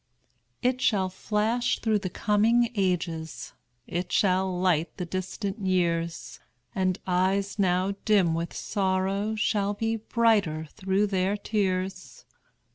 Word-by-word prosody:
It 255 +1 +1
shall 190 -6 +2
flash 215 +5 0
through 220 -2 +1
coming 220 +5 +2
ages, 175 -5 -2 0.3
It 175 +1 -4
shall 190 -1 +2
light 175 -3 +1
the 180 - -3
distant 190 +4 -4
years; 170 -3 -1 0.3
And 185 -1 0
eyes 190 +3 0
now 185 0 +2
dim 195 -6 +3
with 170 +1 -2
sorrow 195 +2 -1
Shall 205 -2 0
be 225 +2 -1
brighter 215 -8 +1
through 195 0 +1
their 195 0 0
tears. 190 -3 -2
190 Hz, 115 wpm, -27 LUFS, 185-210 Hz, 0.3 s, dim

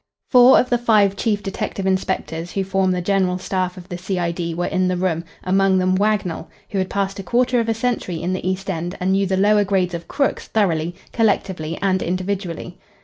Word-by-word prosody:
Four 250 0 +8
of 250 - -1
the 245 - +3
five 210 -4 +3
chief 205 0 -1
detective 195 0 -4
inspectors 175 -3 -2
who 195 - 0
form 190 0 +1
the 180 -1 0
general 185 -1 +1
staff 185 0 -2
of 180 0 -10
the 175 -2 -6
C.I.D. 175 -2 -2
were 175 +1 -1
in 185 -1 0
the 185 0 0
room, 175 -2 -1 0.2
among 190 +1 +3
them 185 0 +2
Wagnell, 195 -5 0 0.2
who 200 - -1
had 185 0 -1
passed 195 0 -2
a - - -5
quarter 245 +4 +2
of 230 -1 -1
a 225 - +1
century 225 -7 -2
in 180 +3 -2
the 185 0 -2
East 190 +1 -3
End 175 0 -3
and 185 +1 0
knew 195 0 +2
the 190 0 0
lower 205 +1 +4
grades 190 -3 0
of 170 0 -6
"crooks" 280 -1 -1
thoroughly, 175 -5 0 0.2
collectively, 190 -7 0
and 190 -1 +2
individually. 185 -1 -3
190 Hz, 205 wpm, -21 LUFS, 180-200 Hz, 0.2 s, Four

